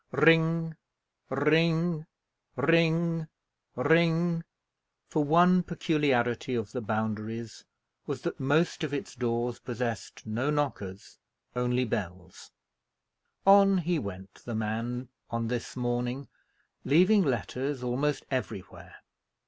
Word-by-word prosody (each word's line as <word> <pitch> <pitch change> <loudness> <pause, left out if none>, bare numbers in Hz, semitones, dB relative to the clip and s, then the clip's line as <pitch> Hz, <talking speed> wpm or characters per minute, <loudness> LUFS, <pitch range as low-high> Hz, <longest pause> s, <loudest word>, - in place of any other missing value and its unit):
Ring 165 0 +4 0.5
ring 160 +3 +2 0.5
ring 165 0 +2 0.5
ring 165 +4 +3 0.6
for 155 - +1
one 175 +4 +5
peculiarity 140 -8 0
of 110 -3 -3
the 125 - -4
Boundaries 110 0 -4 0.4
was, - - -4
that - - -3
most 155 +6 +1
of 145 -2 -2
its 140 - -5
doors 120 -1 -2
possessed 120 -2 -5
no 115 +6 -1
knockers, 100 -11 -3 0.4
only 125 +1 +1
bells 90 -5 -5 1.0
on 195 0 +7
he 175 -1 0
went, 95 -3 -8
the 120 - -5
man, 115 +3 -3 0.2
on 115 -1 -2
this 120 -1 -4
morning, 125 +2 -2 0.6
leaving 185 +8 +5
letters 135 -2 -2
almost 135 +4 -1
everywhere. 110 -7 -5
130 Hz, 100 wpm, -29 LUFS, 115-165 Hz, 1.0 s, on